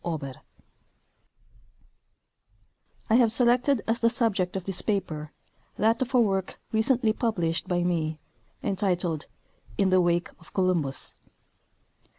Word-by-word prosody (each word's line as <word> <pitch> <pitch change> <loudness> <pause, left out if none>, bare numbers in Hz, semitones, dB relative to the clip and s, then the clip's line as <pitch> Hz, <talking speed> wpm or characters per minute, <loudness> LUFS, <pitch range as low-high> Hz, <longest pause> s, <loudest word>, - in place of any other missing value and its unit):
OBER 150 -6 -4 2.7
I - - +1
have 235 -3 +4
selected 245 +1 +3
as 225 +1 +1
the 230 - +4
subject 205 -7 0
of 190 -2 -4
this 195 -2 +1
paper 160 -8 -2 0.4
that 225 +5 +2
of 260 +1 -1
a - - +6
work 195 -5 0
re 220 - +2
cently 235 -2 +3
]3ublished 180 -8 -1
by 175 -1 0
me, 160 -3 -1 0.4
entitled 180 -5 -1 0.3
" - - -25
In 195 -2 +2
the 185 0 +5
Wake 175 0 +1
of 165 - -17
Columbus." 175 -8 0
190 Hz, 130 wpm, -26 LUFS, 175-225 Hz, 2.7 s, a